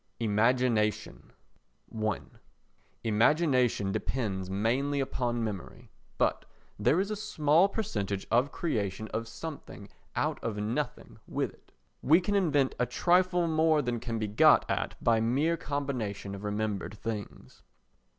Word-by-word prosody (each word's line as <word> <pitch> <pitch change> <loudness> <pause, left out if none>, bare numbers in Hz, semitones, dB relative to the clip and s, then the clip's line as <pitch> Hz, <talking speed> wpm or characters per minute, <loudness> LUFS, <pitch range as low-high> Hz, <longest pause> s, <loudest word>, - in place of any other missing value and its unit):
Imagination 115 0 +1 0.6
i 110 -2 0 0.8
Imagination 120 -2 +2
depends 105 -4 -2
mainly 125 +9 0
upon 120 -3 -1
memory, 105 +2 -6 0.3
but - - +1 0.4
there 165 - +3
is 200 +2 -1
a - - -1
small 180 -4 +3
percentage 100 - -3
of 125 +4 +3
creation 110 - -2
of 115 +1 -3
something 140 -6 -8 0.3
out - - -1
of 110 -2 -2
nothing 105 +3 -3
with - - -2
it. - - -26 0.3
We 160 +6 +5
can 195 +3 -2
invent 150 -9 +2
a 125 - +2
trifle 180 0 +2
more 160 -1 +3
than 120 -1 -2
can 115 -1 -4
be 110 - -1
got 105 - +5
at - - -2
by 115 -1 +4
mere 140 +9 +2
combination 125 -11 -3
of 100 +1 -8
remembered 105 0 -3
things. 105 -1 -7
120 Hz, 130 wpm, -29 LUFS, 105-150 Hz, 0.8 s, We